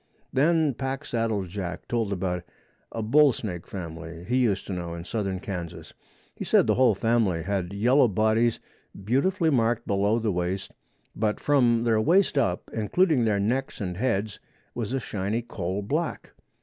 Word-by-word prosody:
Then 155 Hz, +2 st, +3 dB
Packsaddle 115 Hz, -6 st, -2 dB
Jack 90 Hz, -1 st, -6 dB
told 115 Hz, -4 st, -1 dB
about 90 Hz, -2 st, -2 dB, 0.5 s
a 115 Hz, -, -3 dB
bull 145 Hz, +5 st, +5 dB
snake 90 Hz, -8 st, -6 dB
family 85 Hz, -2 st, -7 dB
he 125 Hz, +2 st, +1 dB
used 110 Hz, -6 st, +1 dB
to 100 Hz, -, -5 dB
know 85 Hz, -2 st, -4 dB
in 85 Hz, -, -7 dB
southern 95 Hz, 0 st, -3 dB
Kansas. 90 Hz, -4 st, -6 dB, 0.4 s
He -, -, -6 dB
said -, -, +4 dB
the -, -, +3 dB
whole 125 Hz, -5 st, +4 dB
family 110 Hz, -6 st, +1 dB
had 95 Hz, -1 st, -2 dB
yellow 125 Hz, +7 st, +4 dB
bodies 110 Hz, +3 st, +2 dB, 0.5 s
beautifully 160 Hz, -, +2 dB
marked 120 Hz, -2 st, +1 dB
below 100 Hz, +1 st, +1 dB
the 110 Hz, -2 st, 0 dB
waist, 90 Hz, +2 st, -3 dB, 0.4 s
but 105 Hz, 0 st, 0 dB
from 120 Hz, -5 st, +3 dB
their 110 Hz, -2 st, +2 dB
waist 180 Hz, -, +3 dB
up, 115 Hz, -10 st, 0 dB
including 130 Hz, -, +2 dB
their 105 Hz, -2 st, +1 dB
necks 125 Hz, +7 st, -1 dB
and 90 Hz, -3 st, -3 dB
heads, 110 Hz, -1 st, -1 dB, 0.3 s
was 115 Hz, -2 st, -4 dB
a 135 Hz, -, 0 dB
shiny 105 Hz, 0 st, -2 dB
coal 95 Hz, -2 st, -4 dB
black. 155 Hz, +10 st, -3 dB
110 Hz, 160 wpm, -26 LUFS, 95-125 Hz, 0.5 s, bull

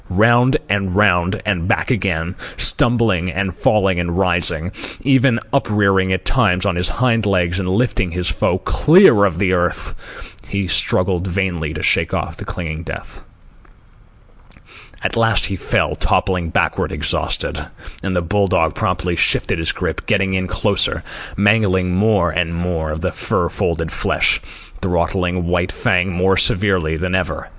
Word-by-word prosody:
Round 120 Hz, +8 st, +3 dB
and 100 Hz, -2 st, -1 dB
round 95 Hz, -1 st, +2 dB
and 90 Hz, -5 st, -1 dB
back -, -, 0 dB
again, 90 Hz, -6 st, -1 dB, 0.2 s
stumbling 110 Hz, -7 st, +2 dB
and 95 Hz, -1 st, -2 dB
falling 95 Hz, -1 st, +1 dB
and 85 Hz, 0 st, -2 dB
rising, 85 Hz, -2 st, +1 dB, 0.3 s
even 130 Hz, -2 st, +3 dB
uprearing 100 Hz, -7 st, +1 dB
at 95 Hz, -, -2 dB
times 90 Hz, +2 st, +1 dB
on 100 Hz, -3 st, 0 dB
his 90 Hz, 0 st, +2 dB
hind 115 Hz, -4 st, 0 dB
legs 90 Hz, -2 st, 0 dB
and 90 Hz, -2 st, -3 dB
lifting 100 Hz, -2 st, 0 dB
his 90 Hz, +1 st, -3 dB
foe 85 Hz, -, 0 dB
clear 155 Hz, -, +4 dB
of 90 Hz, -5 st, -1 dB
the 95 Hz, 0 st, +1 dB
earth, 90 Hz, -1 st, -4 dB
he 100 Hz, -1 st, -2 dB
struggled 90 Hz, 0 st, 0 dB
vainly 90 Hz, -4 st, -2 dB
to 75 Hz, -, -5 dB
shake -, -, +1 dB
off -, -, -4 dB
the -, -, -8 dB
clinging 80 Hz, -2 st, -5 dB
death. 85 Hz, -, -9 dB, 1.8 s
At -, -, -1 dB
last 115 Hz, -3 st, +2 dB
he 100 Hz, -, -3 dB
fell, 90 Hz, -, -1 dB
toppling 90 Hz, -3 st, -1 dB
backward, -, -, -1 dB
exhausted; -, -, -2 dB, 0.4 s
and 95 Hz, -1 st, -3 dB
the 90 Hz, -, 0 dB
bull 100 Hz, +3 st, 0 dB
dog -, -, +1 dB
promptly 90 Hz, -1 st, -2 dB
shifted 80 Hz, -, +3 dB
his 80 Hz, -, +1 dB
grip, -, -, -5 dB
getting 95 Hz, -2 st, +1 dB
in 95 Hz, -1 st, -1 dB
closer, -, -, 0 dB, 0.3 s
mangling 100 Hz, -3 st, +2 dB
more 100 Hz, -2 st, +2 dB
and 85 Hz, 0 st, -1 dB
more 85 Hz, -2 st, -3 dB
of 75 Hz, +1 st, -5 dB
the -, -, -1 dB
fur -, -, -1 dB
folded 80 Hz, -1 st, -2 dB
flesh, -, -, +1 dB, 0.4 s
throttling 90 Hz, 0 st, -1 dB
White 90 Hz, +1 st, -1 dB
Fang 95 Hz, +1 st, 0 dB
more 95 Hz, +2 st, +1 dB
severely 90 Hz, -6 st, +2 dB
than 90 Hz, +2 st, -3 dB
ever. 95 Hz, -3 st, -2 dB
95 Hz, 150 wpm, -18 LUFS, 85-100 Hz, 1.8 s, clear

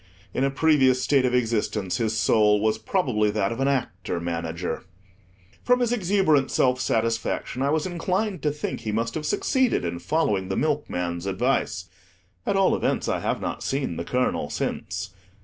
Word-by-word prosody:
In 130 Hz, -, 0 dB
a 135 Hz, -, +3 dB
previous 135 Hz, -3 st, +3 dB
state 135 Hz, 0 st, +3 dB
of 125 Hz, 0 st, +1 dB
existence, 110 Hz, -5 st, 0 dB
his 110 Hz, -2 st, 0 dB
soul 105 Hz, -2 st, +4 dB
was 110 Hz, +1 st, +1 dB
probably 120 Hz, -, +1 dB
that 105 Hz, -1 st, 0 dB
of 115 Hz, -, -4 dB
an 135 Hz, -, +2 dB
Actor 95 Hz, -10 st, -1 dB
Manager. 85 Hz, 0 st, -3 dB, 0.8 s
From 250 Hz, 0 st, +3 dB
his 240 Hz, -2 st, +1 dB
exuberant 185 Hz, -, +2 dB
self 130 Hz, 0 st, +2 dB
satisfaction, 115 Hz, +1 st, -1 dB
I 140 Hz, -, +2 dB
was 155 Hz, +1 st, +1 dB
inclined 185 Hz, +3 st, -1 dB
to 150 Hz, -, +1 dB
think 150 Hz, -, -4 dB
he 110 Hz, -, -4 dB
must 115 Hz, +2 st, -1 dB
have 155 Hz, -1 st, -3 dB
succeeded 260 Hz, -, +1 dB
in 85 Hz, 0 st, -3 dB
following 105 Hz, -, 0 dB
the -, -, -1 dB
milkman's 90 Hz, -, -1 dB
advice; 100 Hz, -2 st, 0 dB, 0.6 s
at -, -, +1 dB
all 195 Hz, -1 st, +4 dB
events, -, -, -1 dB
I -, -, 0 dB
have -, -, -2 dB
not -, -, -4 dB
seen 130 Hz, -, -2 dB
the -, -, -3 dB
colonel 125 Hz, +7 st, -1 dB
since. 95 Hz, +1 st, -3 dB
125 Hz, 170 wpm, -25 LUFS, 105-150 Hz, 0.8 s, soul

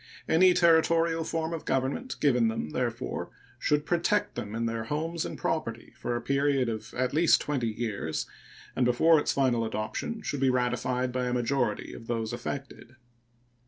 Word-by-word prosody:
Any 180 Hz, +2 st, +5 dB
Territorial 165 Hz, -1 st, +4 dB
form 160 Hz, 0 st, -2 dB
of 165 Hz, -, -4 dB
government 135 Hz, -, -1 dB
given 125 Hz, -5 st, +3 dB
them, 110 Hz, -9 st, -3 dB
therefore, -, -, -3 dB, 0.3 s
should 150 Hz, 0 st, +1 dB
protect 175 Hz, +4 st, +1 dB
them 105 Hz, +1 st, -5 dB
in 115 Hz, 0 st, -1 dB
their 115 Hz, -1 st, -2 dB
homes 160 Hz, +5 st, -2 dB
and -, -, -5 dB
property 115 Hz, -9 st, -3 dB
for 120 Hz, 0 st, -3 dB
a 120 Hz, -, -2 dB
period 140 Hz, -1 st, +1 dB
of 110 Hz, -1 st, -5 dB
at 130 Hz, +1 st, 0 dB
least 165 Hz, +3 st, +5 dB
twenty 130 Hz, -6 st, -1 dB
years, 110 Hz, -7 st, -3 dB, 0.5 s
and 130 Hz, -, +2 dB
before 150 Hz, +7 st, +5 dB
its -, -, 0 dB
final 125 Hz, -4 st, +2 dB
adoption 110 Hz, -, -3 dB
should 145 Hz, -, -3 dB
be 135 Hz, 0 st, +3 dB
ratified 125 Hz, 0 st, 0 dB
by 125 Hz, 0 st, -1 dB
a 125 Hz, -, -1 dB
majority 120 Hz, -3 st, -1 dB
of 115 Hz, -, -10 dB
those 115 Hz, -1 st, -2 dB
affected. 130 Hz, 0 st, -6 dB
130 Hz, 165 wpm, -28 LUFS, 115-160 Hz, 0.5 s, Any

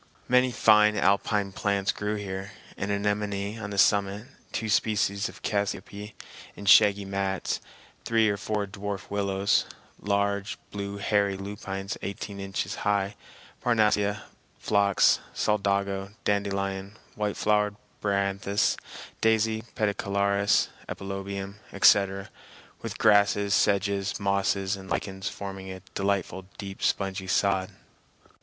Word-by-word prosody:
Many 125 Hz, 0 st, +4 dB
fine 105 Hz, -2 st, +5 dB
alpine 100 Hz, +1 st, +2 dB
plants 100 Hz, 0 st, 0 dB
grew 105 Hz, +1 st, -3 dB
here, 100 Hz, 0 st, -5 dB, 0.2 s
an 100 Hz, -, -3 dB
anemone 100 Hz, +1 st, -1 dB
on 100 Hz, -2 st, -5 dB
the 100 Hz, -, -5 dB
summit, 100 Hz, +1 st, +3 dB, 0.3 s
two 110 Hz, -, -2 dB
species 100 Hz, -1 st, +1 dB
of -, -, -14 dB
cassiope 100 Hz, 0 st, -3 dB, 0.4 s
in 100 Hz, -, -9 dB
shaggy 100 Hz, 0 st, +6 dB
mats, 95 Hz, -1 st, -2 dB, 0.4 s
three 115 Hz, -1 st, +3 dB
or 100 Hz, -, +1 dB
four 105 Hz, 0 st, -2 dB
dwarf 100 Hz, 0 st, -6 dB
willows, 100 Hz, -1 st, +1 dB, 0.3 s
large 100 Hz, 0 st, 0 dB
blue 100 Hz, 0 st, -5 dB
hairy 100 Hz, -1 st, +1 dB
lupines 95 Hz, 0 st, -5 dB
eighteen 100 Hz, 0 st, -5 dB
inches 95 Hz, -1 st, -3 dB
high, 100 Hz, -1 st, 0 dB, 0.5 s
parnassia, 105 Hz, -3 st, +2 dB, 0.3 s
phlox, 100 Hz, -2 st, +3 dB, 0.2 s
solidago, 100 Hz, -1 st, 0 dB
dandelion, 100 Hz, 0 st, -1 dB, 0.2 s
white 105 Hz, -1 st, -2 dB
flowered 105 Hz, -1 st, +2 dB, 0.3 s
bryanthus, 100 Hz, +1 st, +1 dB, 0.4 s
daisy, 110 Hz, 0 st, +2 dB
pedicularis, 100 Hz, -1 st, +1 dB, 0.2 s
epilobium, 100 Hz, 0 st, -5 dB
etc., 100 Hz, 0 st, +4 dB, 0.5 s
with -, -, -5 dB
grasses, 100 Hz, -1 st, +4 dB
sedges, 100 Hz, 0 st, +1 dB
mosses, 100 Hz, 0 st, +1 dB
and 95 Hz, -1 st, -11 dB
lichens, 95 Hz, 0 st, -2 dB
forming 95 Hz, -1 st, -7 dB
a 95 Hz, -, -7 dB
delightful 95 Hz, -1 st, -1 dB
deep 100 Hz, -1 st, -7 dB
spongy 95 Hz, -1 st, -1 dB
sod. 95 Hz, 0 st, +1 dB
100 Hz, 110 wpm, -27 LUFS, 100-105 Hz, 0.5 s, shaggy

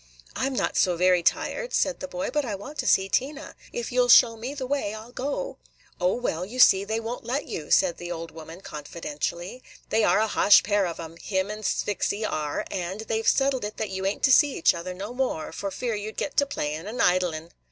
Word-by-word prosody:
"I 265 Hz, -, 0 dB
'm 270 Hz, -, -3 dB
not -, -, -1 dB
so 180 Hz, -3 st, +3 dB
very 180 Hz, 0 st, +4 dB
tired," -, -, 0 dB
said 280 Hz, -, +1 dB
the 280 Hz, -, -5 dB
boy; 275 Hz, +1 st, -4 dB
"but 295 Hz, -1 st, +1 dB
I 220 Hz, -6 st, -3 dB
want 265 Hz, +10 st, -9 dB
to -, -, -1 dB
see 190 Hz, 0 st, +4 dB
Tina. 280 Hz, +9 st, -2 dB, 0.2 s
If 240 Hz, 0 st, -4 dB
you 250 Hz, 0 st, +3 dB
'll 245 Hz, -, +1 dB
show 235 Hz, -1 st, +7 dB
me 245 Hz, +6 st, -6 dB
the 270 Hz, -3 st, -4 dB
way, 255 Hz, -6 st, -2 dB
I 215 Hz, -, -8 dB
'll 235 Hz, -, -15 dB
go." 285 Hz, -, -4 dB, 0.4 s
"O, 180 Hz, +1 st, +2 dB
well, 180 Hz, -9 st, -2 dB
you 215 Hz, +7 st, -7 dB
see, 195 Hz, -5 st, +7 dB
they 220 Hz, +2 st, -2 dB
won't 230 Hz, +2 st, -5 dB
let 255 Hz, +5 st, -2 dB
you," 150 Hz, -, -6 dB
said 175 Hz, -3 st, +3 dB
the 175 Hz, 0 st, -6 dB
old 165 Hz, -1 st, -5 dB
woman 165 Hz, +2 st, -10 dB
confidentially. 170 Hz, -, -5 dB, 0.3 s
"They 225 Hz, -, +2 dB
are -, -, +4 dB
a 220 Hz, -, +2 dB
ha'sh 205 Hz, -1 st, +6 dB
pair 205 Hz, -2 st, +1 dB
of 170 Hz, -, -6 dB
'em, 165 Hz, 0 st, -8 dB
him 190 Hz, +2 st, -2 dB
and 215 Hz, 0 st, -7 dB
Sphyxy 205 Hz, +1 st, -1 dB
are; 150 Hz, -1 st, -2 dB
and 185 Hz, +2 st, -3 dB
they 220 Hz, 0 st, -2 dB
've 225 Hz, -, -5 dB
settled 270 Hz, -3 st, +2 dB
it 210 Hz, +1 st, -5 dB
that 215 Hz, -3 st, -3 dB
you 190 Hz, 0 st, -4 dB
ain't 195 Hz, -, -3 dB
to 265 Hz, -, +5 dB
see 285 Hz, +2 st, +5 dB
each -, -, +4 dB
other 180 Hz, +1 st, -6 dB
no 200 Hz, +6 st, -6 dB
more, 250 Hz, -11 st, -2 dB
for 200 Hz, -, -4 dB
fear 235 Hz, +4 st, -3 dB
you 210 Hz, +1 st, -4 dB
'd -, -, -26 dB
get 290 Hz, -, -3 dB
to 285 Hz, -, +4 dB
playin' 155 Hz, -, -3 dB
and 235 Hz, +4 st, -6 dB
idlin'." 175 Hz, -5 st, +1 dB
210 Hz, 245 wpm, -26 LUFS, 180-250 Hz, 0.4 s, show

